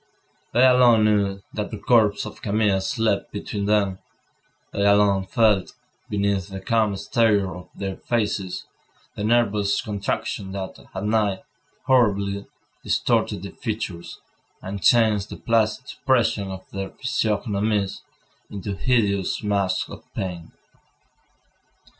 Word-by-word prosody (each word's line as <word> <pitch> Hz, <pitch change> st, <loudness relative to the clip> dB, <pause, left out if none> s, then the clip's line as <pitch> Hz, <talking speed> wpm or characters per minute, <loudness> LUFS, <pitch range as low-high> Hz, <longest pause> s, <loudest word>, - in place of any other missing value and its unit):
They 125 Hz, +2 st, +5 dB
alone 125 Hz, -4 st, +6 dB
knew 100 Hz, -2 st, +1 dB
that 105 Hz, -1 st, -3 dB
the 110 Hz, -, -6 dB
corpse 110 Hz, -4 st, +3 dB
of 105 Hz, -, -9 dB
Camille 105 Hz, -2 st, +1 dB
slept 110 Hz, +3 st, 0 dB
between 100 Hz, -1 st, -4 dB
them; 100 Hz, -3 st, +1 dB, 0.7 s
they 100 Hz, -, 0 dB
alone 100 Hz, -1 st, +4 dB
felt, 105 Hz, -4 st, +2 dB, 0.4 s
beneath 100 Hz, -2 st, 0 dB
the 95 Hz, -1 st, -7 dB
calm 110 Hz, -1 st, +1 dB
exterior 100 Hz, -1 st, +1 dB
of 90 Hz, 0 st, -11 dB
their 95 Hz, -1 st, -4 dB
faces, 105 Hz, -5 st, -2 dB, 0.5 s
the 105 Hz, -, -5 dB
nervous 105 Hz, -3 st, +2 dB
contractions 100 Hz, -1 st, -3 dB
that, 95 Hz, -1 st, -6 dB, 0.2 s
at 95 Hz, -, -3 dB
night, 105 Hz, -2 st, +1 dB, 0.4 s
horribly 100 Hz, -6 st, +2 dB, 0.4 s
distorted -, -, 0 dB
their -, -, -6 dB
features, 85 Hz, 0 st, -5 dB, 0.4 s
and 100 Hz, +1 st, -6 dB
changed 110 Hz, -3 st, +4 dB
the -, -, -7 dB
placid 115 Hz, +1 st, +1 dB
expression 120 Hz, -7 st, 0 dB
of 95 Hz, 0 st, -8 dB
their 95 Hz, -1 st, -4 dB
physiognomies 105 Hz, -4 st, -1 dB, 0.5 s
into 100 Hz, 0 st, -5 dB
hideous 100 Hz, -5 st, +1 dB
masks 100 Hz, -3 st, 0 dB
of -, -, -10 dB
pain. 90 Hz, -3 st, -5 dB
100 Hz, 120 wpm, -23 LUFS, 95-110 Hz, 0.7 s, alone